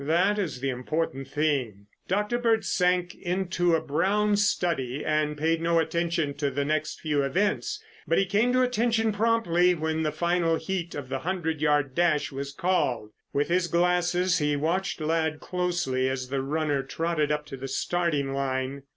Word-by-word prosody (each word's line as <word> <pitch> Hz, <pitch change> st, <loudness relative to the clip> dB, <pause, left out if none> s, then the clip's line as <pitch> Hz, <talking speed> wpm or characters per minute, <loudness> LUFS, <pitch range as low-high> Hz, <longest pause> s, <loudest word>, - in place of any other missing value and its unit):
That 180 Hz, +8 st, +2 dB
is 160 Hz, -10 st, -3 dB
the 135 Hz, 0 st, 0 dB
important 135 Hz, +1 st, -3 dB
thing." 135 Hz, -9 st, -1 dB, 0.2 s
Dr. 210 Hz, +5 st, 0 dB
Bird 225 Hz, -3 st, +2 dB
sank 180 Hz, -1 st, +1 dB
into 175 Hz, -1 st, 0 dB
a 160 Hz, -, 0 dB
brown 200 Hz, +8 st, +2 dB
study 165 Hz, -10 st, 0 dB
and 150 Hz, -1 st, 0 dB
paid 160 Hz, +2 st, +1 dB
no 170 Hz, 0 st, +2 dB
attention 165 Hz, -2 st, 0 dB
to 145 Hz, -1 st, 0 dB
the 140 Hz, +1 st, -2 dB
next 155 Hz, +1 st, -1 dB
few 150 Hz, -2 st, 0 dB
events, 200 Hz, -, 0 dB, 0.3 s
but -, -, +2 dB
he 195 Hz, -, +3 dB
came 210 Hz, +6 st, +2 dB
to 255 Hz, 0 st, +4 dB
attention 230 Hz, -2 st, +1 dB
promptly 205 Hz, -5 st, +2 dB
when 160 Hz, 0 st, -1 dB
the 155 Hz, -1 st, 0 dB
final 170 Hz, -1 st, +1 dB
heat 170 Hz, +1 st, -3 dB
of 140 Hz, -3 st, -6 dB
the 135 Hz, 0 st, -2 dB
hundred 160 Hz, -1 st, -2 dB
yard 145 Hz, -3 st, +2 dB
dash 155 Hz, -2 st, +1 dB
was 140 Hz, +1 st, -5 dB
called. 140 Hz, -10 st, 0 dB, 0.2 s
With 145 Hz, +3 st, 0 dB
his 180 Hz, 0 st, +2 dB
glasses 180 Hz, +1 st, +2 dB
he 150 Hz, -1 st, +1 dB
watched 180 Hz, +7 st, -1 dB
Ladd 160 Hz, 0 st, 0 dB
closely 175 Hz, -8 st, -1 dB
as 130 Hz, -1 st, -3 dB
the 135 Hz, 0 st, -1 dB
runner 145 Hz, 0 st, 0 dB
trotted 155 Hz, +2 st, -1 dB
up 150 Hz, 0 st, -1 dB
to 135 Hz, -, -7 dB
the 135 Hz, +1 st, -6 dB
starting 145 Hz, -1 st, -1 dB
line. 135 Hz, 0 st, -2 dB
165 Hz, 170 wpm, -27 LUFS, 140-180 Hz, 0.3 s, to